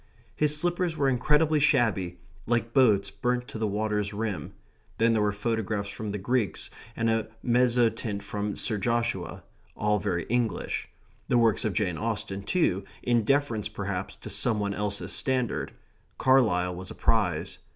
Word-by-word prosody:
His 150 0 +2
slippers 175 0 0
were 140 - +2
incredibly 150 +4 +3
shabby, 105 - +2 0.3
like 115 0 0
boats 105 -7 +4
burnt 125 0 -1
to 110 - -6
the 110 - +1
water's 105 0 -1
rim. 100 -7 -3 0.4
Then 115 +1 +3
there 110 - +2
were 105 0 +2
photographs 105 -1 -2
from 110 +1 -5
the 105 - -2
Greeks, 115 +2 -1 0.2
and 115 - 0
a 110 -1 +1 0.2
mezzotint 120 -4 +2
from 105 0 -3
Sir 105 - 0
Joshua 115 +2 -1 0.3
all 105 0 +2
very 90 -5 -1
English. 120 +2 -1 0.4
The 125 - +3
works 115 -3 +3
of 105 - 0
Jane 90 -4 0
Austen, 105 -3 -3
too, 100 - +1 0.2
in 120 -2 +2
deference, 120 -4 +1
perhaps, 95 -2 -4
to - - -9
some 110 -3 +1
one 100 -1 -1
else's 105 0 -2
standard. 130 -3 0 0.5
Carlyle 105 -9 +3
was 95 +1 -7
a - - -8
prize. - - 0
110 Hz, 155 wpm, -27 LUFS, 100-125 Hz, 0.5 s, boats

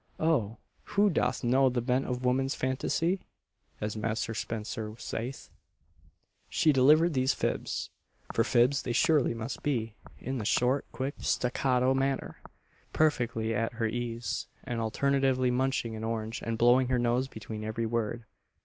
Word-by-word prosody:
("Oh! 120 -10 +1 0.4
who 205 0 +5
doth 125 -5 0
know 130 +2 +4
the 125 -1 -1
bent 125 +3 0
of 125 0 -3
woman's 135 +2 +1
phantasy?" 165 +8 0 0.6
as 105 0 -3
Master 110 +1 -2
Spenser 110 -1 -4
saith.) 120 +3 -5 1.0
She 155 - +3
delivered 155 +6 +5
these 130 0 +2
fibs - - -2 0.4
for 115 - +3
fibs 125 +3 +3
they 120 - -3
surely 145 -3 +3
must 115 +1 -5
be 115 -6 -1 0.2
in 130 +1 -4
the - - -3
short, 125 +5 +1
quick, 130 +4 -3
staccato 125 0 +1
manner, 135 0 -1 0.5
perfectly 120 -7 +1
at 115 +2 -1
her 115 -1 -1
ease, 115 -1 -3 0.2
and 120 -2 -3
alternately 130 +2 +1
munching 125 -2 0
an 110 - -6
orange 115 0 -3
and 115 0 -2
blowing 125 +2 +5
her 130 0 +1
nose 120 +2 +1
between 110 -2 -7
every 110 +1 -2
word. 115 0 -2
125 Hz, 145 wpm, -29 LUFS, 115-135 Hz, 1.0 s, who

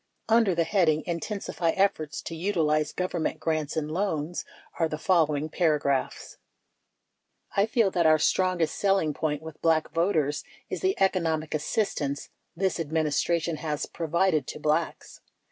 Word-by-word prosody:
52 225 - +5
Under 220 -6 +3
the 165 - +3
heading 160 -4 +2
"Inten 175 +5 -3
sify 165 -2 -1
Efforts 160 -6 0
To - - -6
Utilize 160 -4 +1
Government 175 -3 -2
Grants 155 -1 -1
and 155 -1 -2
Loans" 170 -2 -2 0.4
are 165 - +3
the 155 - -3
fol 165 -1 +3
lowing 150 0 -2
paragraphs: 150 -5 0 1.2
I 200 +2 +3
feel 225 -4 +2
that 170 -3 +3
our 155 0 +6
strongest 180 +1 +1
selling 195 -6 +2
point 150 0 -2
with 160 -1 -10
Black 160 -1 +2
voters 165 -4 +1 0.3
is - - -3
the 380 0 0
economic 165 -5 +1
assistance 150 -3 -1 0.3
this 190 +1 0
Administration 160 +1 0
has 150 -1 -3
provided 165 -2 0
to - - -6
Blacks. 155 +2 -2
160 Hz, 145 wpm, -27 LUFS, 155-185 Hz, 1.2 s, our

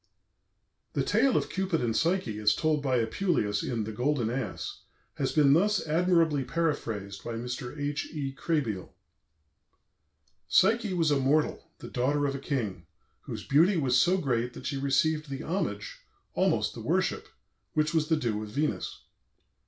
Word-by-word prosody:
The - - +1
tale 270 -2 +3
of - - -2
Cupid 190 -3 0
and 115 -2 -1
Psyche, 165 - 0
as 105 0 +3
told 155 -2 +1
by 130 -3 +1
Apuleius 110 - 0
in 115 -3 -2
"The 110 - -5
Golden 125 0 0
Ass," 120 -6 -4 0.4
has - - 0
been 145 -3 +5
thus 200 +6 +2
admirably 165 -3 +2
paraphrased 115 - -2
by 120 - -4
Mr. 125 +4 -5
H. 145 0 -2
E. 140 -4 -4
Krehbiel: 135 - -2 1.5
"Psyche 215 0 +3
was 165 -3 +2
a 145 - +3
mortal, 145 +3 +1
the - - -9
daughter 145 +3 0
of 140 - 0
a 140 - -4
king, 105 - -3 0.4
whose - - -6
beauty 170 +7 +4
was 130 -5 +2
so 175 +8 +4
great 125 -7 -1
that - - -10
she 140 - -2
received 150 +3 +1
the 135 +1 -5
homage, 130 - -3 0.3
almost - - +1
the - - -8
worship, - - 0 0.5
which 155 +1 +1
was 155 -2 +2
the 160 - +2
due 115 -7 -1
of 105 - -6
Venus. 145 +7 -2
140 Hz, 160 wpm, -29 LUFS, 120-160 Hz, 1.5 s, been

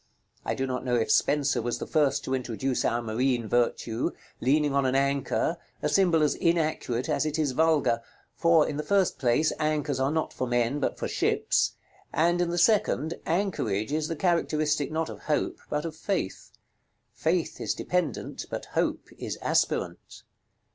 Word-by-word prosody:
I - - -2
do 135 - -1
not 125 -1 -3
know 125 -1 0
if 115 -2 +1
Spenser 145 -1 +2
was 120 - -2
the - - -5
first 150 -4 +1
to 130 - -3
introduce 130 0 -1
our 120 +1 0
marine 120 +1 0
virtue, 120 0 0 0.3
leaning 145 +2 +2
on 140 -1 +2
an 130 - 0
anchor, 140 0 +1 0.3
a - - +2
symbol 175 -5 +3
as 150 - +3
inaccurate 155 -7 0
as 155 -1 +1
it 155 0 -2
is 150 -4 +1
vulgar: 155 -5 +2 0.3
for, 165 -2 +4
in 145 - -3
the - - 0
first 195 +2 +1
place, 130 +4 +2
anchors 150 -3 0
are 135 +1 +2
not 160 +1 -1
for 130 - -2
men, 120 +3 +1
but 140 - -1
for - - -3
ships; - - +1 0.4
and 175 +2 +2
in 175 - +1
the 175 - -2
second, 170 - +3
anchorage 150 - 0
is 155 0 0
the 165 - -3
characteristic 155 -4 +1
not 160 0 -1
of - - -8
Hope, 150 - 0
but 150 +1 -1
of 160 -2 -5
Faith. 165 - -3 0.6
Faith 165 +1 -1
is - - -1
dependent, 180 -7 -2
but - - -5
Hope - - 0
is - - -4
aspirant. - - -1
150 Hz, 175 wpm, -27 LUFS, 130-160 Hz, 0.6 s, for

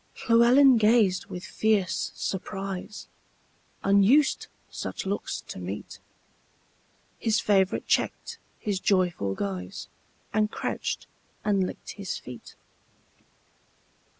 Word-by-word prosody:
Llewelyn 245 +3 +6
gazed 215 -4 +3
with 180 - -7
fierce 210 -5 0
surprise; 195 +1 -5 0.8
Unused 200 +9 +4 0.2
such - - -5
looks 200 +2 -3
to - - -9
meet, 95 +3 -6 1.2
His 220 -1 +2
favorite 195 -2 +2
checked - - -1 0.2
his 205 -3 -2
joyful 180 - +1
guise, 95 -2 -5 0.4
And 215 0 +2
crouched - - -3 0.4
and 200 -3 +2
licked - - -8
his 200 -3 -5
feet. 125 -1 -11
195 Hz, 95 wpm, -27 LUFS, 180-220 Hz, 1.2 s, Llewelyn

